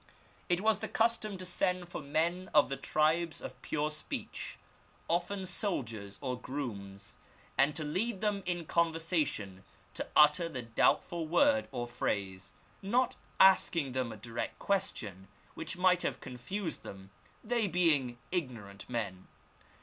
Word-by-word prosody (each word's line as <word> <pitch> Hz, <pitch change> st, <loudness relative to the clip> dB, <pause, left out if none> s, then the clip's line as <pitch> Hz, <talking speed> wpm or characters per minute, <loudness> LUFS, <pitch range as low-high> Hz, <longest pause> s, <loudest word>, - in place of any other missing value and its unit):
It 175 Hz, +1 st, +2 dB
was 215 Hz, -1 st, +3 dB
the -, -, -3 dB
custom 225 Hz, -3 st, +1 dB
to 185 Hz, -, -6 dB
send 180 Hz, 0 st, +1 dB
for 175 Hz, -, -6 dB
men 165 Hz, +6 st, 0 dB
of 150 Hz, -, +6 dB
the 135 Hz, -, -1 dB
tribes 160 Hz, +3 st, +1 dB
of -, -, -8 dB
pure 150 Hz, 0 st, -1 dB
speech, 150 Hz, -, -5 dB, 0.5 s
often 180 Hz, +3 st, 0 dB
soldiers 115 Hz, -, -2 dB
or 125 Hz, -1 st, -2 dB
grooms, 100 Hz, -8 st, -6 dB, 0.4 s
and 140 Hz, +3 st, +3 dB
to 155 Hz, -, -1 dB
lead 190 Hz, +8 st, -1 dB
them 210 Hz, -1 st, 0 dB
in 175 Hz, -2 st, -1 dB
conversation 160 Hz, -, 0 dB, 0.3 s
to -, -, -3 dB
utter 150 Hz, +3 st, +6 dB
the 130 Hz, -6 st, -5 dB
doubtful 160 Hz, +8 st, +2 dB
word 275 Hz, -, +4 dB
or 120 Hz, -3 st, -2 dB
phrase, 100 Hz, -6 st, -3 dB, 0.3 s
not 240 Hz, +6 st, +2 dB, 0.2 s
asking 170 Hz, -6 st, +5 dB
them 130 Hz, -2 st, -1 dB
a 110 Hz, -, -8 dB
direct 115 Hz, +2 st, -4 dB
question, 110 Hz, -, -1 dB, 0.3 s
which -, -, -4 dB
might 180 Hz, 0 st, +4 dB
have -, -, -2 dB
confiised 165 Hz, -, -5 dB
them, 95 Hz, 0 st, -10 dB, 0.3 s
they 230 Hz, -1 st, +1 dB
being 155 Hz, -9 st, +2 dB
ignorant 120 Hz, -, -4 dB
men. 100 Hz, -6 st, -3 dB
155 Hz, 140 wpm, -32 LUFS, 120-185 Hz, 0.5 s, of